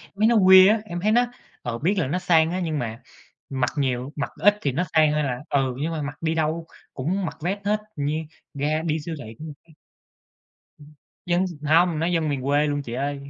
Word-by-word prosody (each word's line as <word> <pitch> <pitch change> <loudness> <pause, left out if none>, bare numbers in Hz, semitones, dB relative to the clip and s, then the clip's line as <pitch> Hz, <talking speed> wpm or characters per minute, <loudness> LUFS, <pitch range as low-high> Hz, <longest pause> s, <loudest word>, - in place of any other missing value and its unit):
mấy 215 +2 +3
nó 235 - +4
weird 190 0 +8
á, 220 -1 +1
em 175 -3 -5
thấy 210 +3 +2
nó 240 +2 +4 0.4
ừ, 115 -1 -3
biết 180 - +1
là 155 - 0
nó 180 +6 -1
sang 165 -3 +3
á 185 - -2
nhưng 160 -4 -2
mà 115 -1 -5 0.5
mặc 130 -2 0
nhiều 130 -1 -1
mặc 145 - -3
ít 205 0 +5
thì 140 - 0
nó 175 +8 0
sang 155 -1 +5
hơn 150 0 0
là 125 -2 -2
ừ, 135 -3 0
nhưng 160 +3 -2
mà 155 -2 -3
mặc 145 +2 -7
đi 160 0 0
đâu 160 +1 -1 0.3
cũng 180 +9 -2
mặc - - -6
vest 195 +4 -2
hết 210 +1 +1 0.2
như 145 +2 -1 0.4
ra 150 +3 -1
đi 155 0 0
siêu 165 +2 -5
thị 110 +1 -10
cũng 155 - -8
mặc 150 - -8
vest. 160 - -20 1.0
Ừm. 150 +1 -16 0.3
Dân 175 +2 +1 0.2
hông, 165 0 +4
nó 165 - 0
dân 165 -3 0
miền 140 -3 -2
quê 145 +2 +2
luôn 145 0 -1
chị 120 -4 -7
ơi. 140 +2 -4
155 Hz, 235 wpm, -24 LUFS, 140-180 Hz, 1.0 s, weird